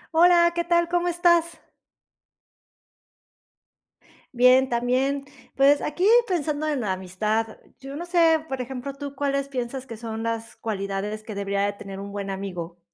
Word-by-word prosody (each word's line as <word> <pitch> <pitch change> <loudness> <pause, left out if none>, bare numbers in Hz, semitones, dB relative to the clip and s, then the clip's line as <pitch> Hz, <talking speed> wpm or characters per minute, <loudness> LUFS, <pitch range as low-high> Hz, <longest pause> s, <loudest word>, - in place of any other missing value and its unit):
Hola, 340 0 +6
¿qué 345 - 0
tal? 345 0 +2
¿Cómo 350 0 +1
estás? 340 -1 +2 2.8
Bien, 255 +2 +6
también, 260 +3 0 0.3
pues, 280 +1 +5
aquí 350 +5 -1 0.2
pensando 310 -4 -1
en 290 -4 -1
la 200 -4 -1
amistad, 210 +4 -2 0.2
yo 270 +1 -8
no 345 +4 -6
sé, 330 -3 +3
por 265 -1 -3
ejemplo, 265 +2 -6
¿tú 280 0 -7
cuáles 275 0 -1
piensas 260 -1 -4
que 230 - -8
son 225 0 -6
las 230 0 -4
cualidades 205 0 -4
que 215 -1 -8
debería 200 0 -1
de 205 - -2
tener 195 -1 -9
un 200 0 -7
buen 200 -1 -4
amigo? 180 -3 -6
260 Hz, 150 wpm, -24 LUFS, 210-305 Hz, 2.8 s, Hola